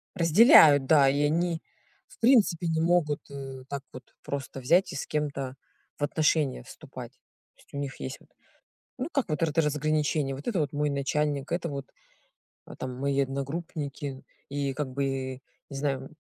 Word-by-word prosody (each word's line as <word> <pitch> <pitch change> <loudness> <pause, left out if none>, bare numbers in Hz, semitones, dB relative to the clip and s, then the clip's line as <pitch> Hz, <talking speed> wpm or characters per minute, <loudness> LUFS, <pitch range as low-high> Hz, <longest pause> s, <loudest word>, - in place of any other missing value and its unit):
Разделяют, 165 - +7
да, 140 -2 +5
и 145 +2 +1
они 165 +2 +1 0.5
в - - -19
принципе 215 -9 +4
не 160 0 +1
могут, 165 -4 +2
э, 135 -2 -7
так 140 -1 -4
вот 130 - -9 0.2
просто 135 -1 -5
взять 170 +9 +3
и - - -7
с - - -3
кем-то 140 -3 -3 0.4
в - - -4
отношения 150 - +1
вступать. - - -10 0.4
То - - -34
есть, - - -26
у - - -5
них 140 -1 -5
есть 130 - -5
вот, - - -23 0.7
ну, 260 +4 -2
как 270 -9 -1
вот 155 - -2
р 160 - +2
это 165 +2 +2
разграничение: 150 -1 0
вот 140 - -10
это 205 -8 0
вот 145 -1 -1
мой 150 0 0
начальник, 140 0 -1
это 170 -1 -1
вот 140 -1 -6 0.9
там 130 -1 -5
мои 140 0 +1
одногруппники, 140 0 -4 0.3
и 140 -1 -2
как 145 0 -3
бы, 135 -1 -2 0.3
не 140 - -8
знаю. 135 -1 -2
145 Hz, 170 wpm, -28 LUFS, 135-160 Hz, 0.9 s, Разделяют